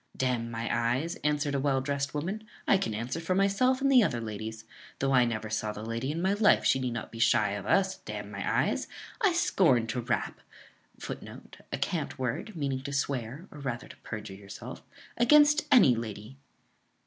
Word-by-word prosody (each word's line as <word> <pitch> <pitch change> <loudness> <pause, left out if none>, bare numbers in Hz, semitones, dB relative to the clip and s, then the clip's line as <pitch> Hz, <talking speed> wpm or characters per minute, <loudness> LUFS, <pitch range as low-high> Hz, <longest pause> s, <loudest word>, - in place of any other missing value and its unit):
"D 130 - 0
n 120 -2 -1
my 115 0 -4
eyes!" 125 +8 0
answered 150 -1 0
a 140 - +1
well 135 -1 +1
dressed 140 +1 -2
woman, 190 +9 -3 0.2
"I 195 - +5
can 110 - -2
answer 120 +8 -3
for 170 +3 -1
myself 200 +7 +2
and 275 0 +3
the 255 -2 +7
other 120 - +1
ladies; 110 0 -6 0.3
though 135 0 0
I 125 -2 +5
never 110 -2 -3
saw 110 -1 -1
the 105 - -7
lady 115 +3 -3
in 165 +3 -3
my 190 +1 +3
life, 210 0 +4
she 135 - +4
need 125 -2 -2
not 115 - -5
be 115 - -9
shy 115 -3 +3
of 100 -1 -5
us, 190 -1 +2
d - - -8
n - - -6
my - - 0
eyes! - - -2 0.3
I 410 -4 +4
scorn 170 - +3
to 115 +2 -3
rap 120 0 -2 0.6
[Footnote: - - -9
A - - -2
cant - - -2
word, 130 - -3
meaning 140 -4 -2
to 140 +1 -6
swear, 140 - -2
or 150 - -11
rather 125 -3 -4
to - - -13
perjure 110 -3 -7
yourself] 100 0 -9 0.4
against 295 +5 +5
any 235 - +7
lady." 115 +3 -7
130 Hz, 200 wpm, -29 LUFS, 115-180 Hz, 0.6 s, the